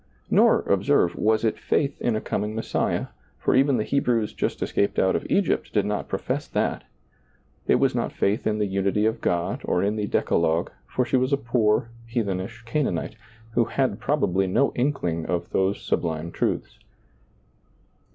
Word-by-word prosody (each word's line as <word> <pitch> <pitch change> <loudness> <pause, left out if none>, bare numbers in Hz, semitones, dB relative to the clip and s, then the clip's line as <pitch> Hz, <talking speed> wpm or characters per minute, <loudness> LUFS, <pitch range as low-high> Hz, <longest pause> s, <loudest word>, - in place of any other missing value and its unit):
Nor, - - +5
observe, 85 - +2
was 110 +1 +2
it 110 - 0
faith 140 -2 0
in 120 - +1
a 110 - -1
coming 105 +2 -2
Messiah, 115 - -1 0.3
for - - +1
even 135 0 +4
the 110 - 0
Hebrews 120 -5 0
just - - -2
escaped 100 - 0
out 95 - +3
of - - -2
Egypt 200 -2 +1
did 105 -2 +1
not 105 0 -2
profess - - -3
that; - - -1 0.8
it - - +5
was - - +2
not - - -1
faith 100 +3 0
in 105 -1 +1
the 105 - +1
unity 100 +2 0
of 110 - 0
God 85 0 -1
or 90 - +1
in 105 +2 0
the 105 -1 -1
Decalogue, 85 -2 +1 0.2
for 125 - 0
she 130 - +1
was 130 +2 +1
a 140 - +3
poor, 115 -3 +1 0.2
heathen 110 -6 -1
ish 115 +5 -8
Canaanite, 115 - -1 0.4
who 115 +1 +2
had 125 -3 -1
probably 95 -8 +1
no 135 +9 +2
inkling 105 - -1
of 85 -1 -2
those 95 +1 +1
sublime 80 0 -2
truths. - - -2
105 Hz, 170 wpm, -25 LUFS, 95-120 Hz, 0.8 s, Nor